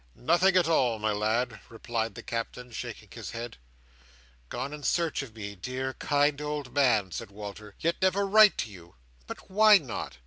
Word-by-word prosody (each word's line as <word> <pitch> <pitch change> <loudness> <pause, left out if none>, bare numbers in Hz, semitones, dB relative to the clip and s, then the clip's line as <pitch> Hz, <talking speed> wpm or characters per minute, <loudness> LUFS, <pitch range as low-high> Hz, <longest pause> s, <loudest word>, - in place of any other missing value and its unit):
"Nothing 180 +7 +3
at 175 -3 +3
all, 125 -8 +2
my 110 0 0
lad," 110 +2 0
replied 115 -2 -3
the - - -8
Captain, 120 +1 -5
shaking 115 - -7
his - - -7
head. 115 +1 -6 0.9
"Gone 130 +4 -4
in 150 - -7
search 165 +2 0
of 120 -5 -10
me, 100 -2 -6
dear, 130 +7 -4
kind 145 +1 +1
old 150 -3 -4
man," 120 -9 +3
said 85 - -6
Walter: 105 0 -9
"yet 170 +1 0
never 190 +2 +2
write 210 +1 +6
to 110 - -3
you! 85 -3 -14 0.3
But - - -9
why 210 +1 +7
not? 130 - -6
125 Hz, 175 wpm, -28 LUFS, 110-155 Hz, 0.9 s, why